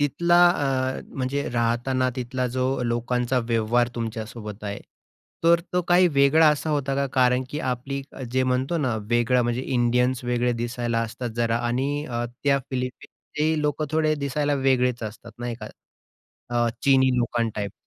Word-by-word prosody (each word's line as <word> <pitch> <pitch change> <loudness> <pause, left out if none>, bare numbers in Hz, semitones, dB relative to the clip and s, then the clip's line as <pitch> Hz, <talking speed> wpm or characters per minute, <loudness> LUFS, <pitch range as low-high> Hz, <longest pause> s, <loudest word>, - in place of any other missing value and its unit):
तिथला 170 +5 +3
अ, 135 -6 0 0.2
म्हणजे 135 +2 -1
राहताना 120 +2 +1
तिथला 125 0 -2
जो 130 0 +1 0.2
लोकांचा 120 +2 0
व्यवहार 115 +1 +2
तुमच्यासोबत 110 -2 -6
आहे, 100 0 -4 0.7
तर 170 0 +5
तो 180 0 +1
काही 180 +1 +5
वेगळा 145 +2 +5
असा 150 +1 0
होता? 140 -2 0
का 140 0 0
कारण 125 -1 +3
की 150 - -3
आपली 135 +3 -4 0.3
जे 130 0 +2
म्हणतो 130 +5 0
ना 130 -7 0 0.2
वेगळा 120 +1 +3
म्हणजे 120 +1 -1
इंडियन्स 125 0 +1
वेगळे 120 0 +1
दिसायला 120 -1 -1
असतात 115 +1 -5
जरा 115 0 +1
आणि 140 +5 -1
अ, 120 -1 -2 0.2
त्या 140 -1 +3
फिलिपीन्सचेही 150 +4 -3
लोकं 150 +1 -1
थोडे 155 -1 +2
दिसायला 145 0 -1
वेगळेच 125 -2 +2
असतात 110 +2 -8
नाही 120 -1 -3
का? 110 - -6 0.8
अ, 120 -1 +2
चिनी 130 -1 +4
लोकां 120 -1 0
टाइप, 100 -2 -3
125 Hz, 150 wpm, -24 LUFS, 120-140 Hz, 0.8 s, तर